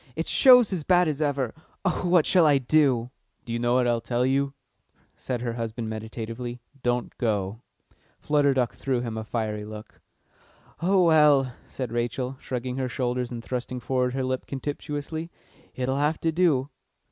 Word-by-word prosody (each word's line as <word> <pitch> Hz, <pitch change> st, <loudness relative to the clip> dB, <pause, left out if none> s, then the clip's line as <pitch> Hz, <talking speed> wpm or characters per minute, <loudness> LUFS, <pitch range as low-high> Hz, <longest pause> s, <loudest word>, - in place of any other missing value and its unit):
"It 165 Hz, -, -2 dB
shows 250 Hz, -6 st, +6 dB
as 170 Hz, -5 st, -2 dB
bad 180 Hz, +1 st, +4 dB
as 155 Hz, -1 st, -2 dB
ever. 140 Hz, -5 st, 0 dB, 0.3 s
Oh, 180 Hz, -1 st, 0 dB
what 175 Hz, -3 st, +5 dB
shall 175 Hz, -4 st, +5 dB
I 145 Hz, -2 st, +5 dB
do?" 130 Hz, -3 st, +2 dB, 0.3 s
"Do 115 Hz, -, -5 dB
you 120 Hz, -, -1 dB
know 120 Hz, +1 st, +1 dB
what 125 Hz, -1 st, +3 dB
I'll 120 Hz, -1 st, +1 dB
tell 120 Hz, +1 st, 0 dB
you?" 135 Hz, +1 st, 0 dB, 0.6 s
said 125 Hz, -3 st, -4 dB
her 120 Hz, -1 st, -2 dB
husband 115 Hz, -1 st, -4 dB
meditatively: 115 Hz, +2 st, -6 dB, 0.2 s
"Don't 120 Hz, 0 st, -1 dB
go!" 105 Hz, -2 st, -1 dB, 0.6 s
Flutter 145 Hz, -2 st, +2 dB
Duck 125 Hz, -3 st, +1 dB
threw 130 Hz, -3 st, -1 dB
him 115 Hz, -2 st, -4 dB
a 110 Hz, -, -4 dB
fiery 110 Hz, -2 st, -3 dB
look. 105 Hz, 0 st, -10 dB, 0.8 s
"Oh 185 Hz, +1 st, +4 dB
well," 150 Hz, -5 st, +5 dB
said 125 Hz, -4 st, -5 dB
Rachel, 120 Hz, +2 st, -2 dB
shrugging 125 Hz, 0 st, -4 dB
her 130 Hz, -1 st, -1 dB
shoulders 125 Hz, 0 st, -2 dB
and 120 Hz, -2 st, -6 dB
thrusting 125 Hz, 0 st, -4 dB
forward 125 Hz, 0 st, 0 dB
her 135 Hz, -, -1 dB
lip 130 Hz, 0 st, -2 dB
contemptuously, 145 Hz, +3 st, -4 dB, 0.5 s
"it'll 130 Hz, +1 st, -1 dB
have 150 Hz, +2 st, +1 dB
to 165 Hz, -, +1 dB
do." 150 Hz, -5 st, +2 dB
130 Hz, 170 wpm, -26 LUFS, 120-145 Hz, 0.8 s, shows